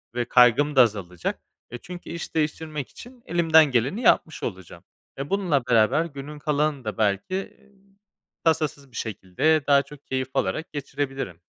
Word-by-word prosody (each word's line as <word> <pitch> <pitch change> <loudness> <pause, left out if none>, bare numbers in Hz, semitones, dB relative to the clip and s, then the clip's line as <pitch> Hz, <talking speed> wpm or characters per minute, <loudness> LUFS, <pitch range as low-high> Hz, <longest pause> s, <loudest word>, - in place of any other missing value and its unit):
ve 120 0 0
kaygım 125 +5 +4
da 130 - +8
azalacak. 100 -7 -1 0.3
E, 120 - -5
çünkü 180 +7 -10
iş 170 -1 -7
değiştirmek 155 -2 -2
için 245 0 -14
elimden 160 -2 +5
geleni 130 - 0
yapmış 160 -8 +2
olacağım. 95 -5 -7 0.3
Eee, 135 +1 -5
bununla 175 -10 +1
beraber 120 +6 +3
günün 145 -1 -8
kalanını 145 -3 -1
da 110 - -4
belki, 105 - 0 0.2
iii, 200 -1 -27 0.5
tasasız 150 -4 0
bir 120 - -10
şekilde 110 - 0
daha 140 -1 +6
çok 140 +1 -15
keyif 130 -1 -2
alarak 100 +14 -1
geçirebilirim. 135 - -4
140 Hz, 150 wpm, -24 LUFS, 120-160 Hz, 0.5 s, da